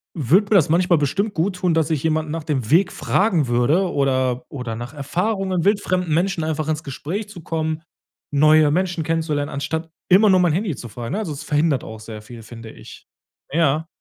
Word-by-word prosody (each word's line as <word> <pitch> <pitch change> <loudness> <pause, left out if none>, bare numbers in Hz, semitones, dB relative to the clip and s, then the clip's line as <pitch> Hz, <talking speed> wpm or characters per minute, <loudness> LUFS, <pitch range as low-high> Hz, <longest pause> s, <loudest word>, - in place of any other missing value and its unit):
würde 170 - +3
mir - - +5
das 170 -7 +4
manchmal 175 +1 +3
bestimmt 200 +9 -1
gut 180 +3 0
tun, 180 -2 +1
dass 160 -1 +1
ich 150 -4 -1
jemanden 155 -1 0
nach 165 0 -4
dem 135 -7 -2
Weg 180 +3 +4
fragen 180 - +1
würde 135 +11 +2
oder 130 -2 0
oder 125 -5 -5
nach 120 +4 -7
Erfahrungen, 180 +5 -1
wildfremden 185 -5 +1
Menschen 175 0 0
einfach 155 -1 -2
ins 155 0 -2
Gespräch 170 - -5
zu 195 -5 -10
kommen, 160 -1 -2 0.5
neue 155 +1 +5
Menschen 180 0 0
kennenzulernen 155 -3 -1
anstatt 160 +4 -3 0.2
immer 200 +3 +6
nur 185 -1 +5
mein 175 -4 +3
Handy 185 -2 -1
zu 120 - -9
fragen, 115 +4 -6
ne, 205 - -1
also 210 -7 -4
es 140 - -8
verhindert 150 -2 +1
auch 110 0 -9
sehr 110 0 -9
viel 115 +1 -12
finde 115 0 -10
ich. - - -14 0.4
Ja. 155 0 +1
160 Hz, 195 wpm, -21 LUFS, 140-180 Hz, 0.5 s, immer